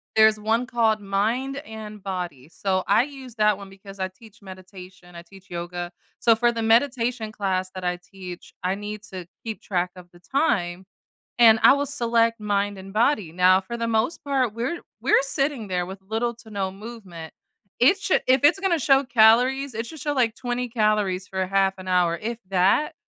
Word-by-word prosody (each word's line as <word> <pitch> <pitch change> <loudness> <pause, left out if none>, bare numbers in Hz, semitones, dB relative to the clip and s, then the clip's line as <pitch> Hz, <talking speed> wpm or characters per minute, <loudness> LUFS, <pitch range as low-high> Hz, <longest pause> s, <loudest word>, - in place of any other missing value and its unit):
there's 220 -1 +5
one 225 +3 0
called 225 -3 +1
Mind 225 +8 -1
and 215 -2 -9
Body, 175 -8 -5
so, 185 +3 -1
I 215 +4 +4
use 265 -4 -10
that 210 -2 +3
one 200 -1 -10
because 195 0 -13
I 190 - -1
teach 220 +3 -18
meditation. 185 -1 -13
I 170 - -9
teach 195 +2 -18
yoga. 175 0 -5 0.3
So, 230 -2 +4
for 240 0 +2
the 230 - -3
meditation 230 -1 +1
class 185 -3 -1
that 185 - -6
I 180 0 -1
teach, 180 -1 -11
I 185 +1 0
need 210 +1 -7
to 180 -2 -7 0.2
keep 220 -2 -6
track 180 -2 -1
of 180 -1 -12
the 175 - -17
time, 190 - 0 0.5
and 225 -2 +7
I - - +8
will 285 0 -1
select 230 -4 +1
Mind 205 -1 -1
and 195 0 -10
Body. 215 - +1
Now 185 +2 +4
for 215 +5 -6
the 230 0 -2
most 230 +8 -1
part, 265 -5 0
we're 245 +10 -3 0.2
we're - - +4
sitting 275 -5 -1
there 180 -1 -1
with 190 +1 -9
little 225 +4 -2
to 220 - -15
no 195 -2 -3
movement. 195 -6 -10 0.5
It 330 +11 +5
should 375 - +1
if 260 +1 +4
it's 295 +6 +5
gonna 360 -5 +1
show 270 +1 +4
calories, 250 +2 +4
it 225 +1 -3
should 315 +2 -10
show, 295 +2 -1
like, 235 -5 +1
20 245 0 -3
calories 210 -5 0
for 190 -1 -2
half 195 0 +2
an 185 - -10
hour 175 -2 +2
if 230 +1 -4
that 195 - +2
215 Hz, 190 wpm, -24 LUFS, 185-240 Hz, 0.5 s, I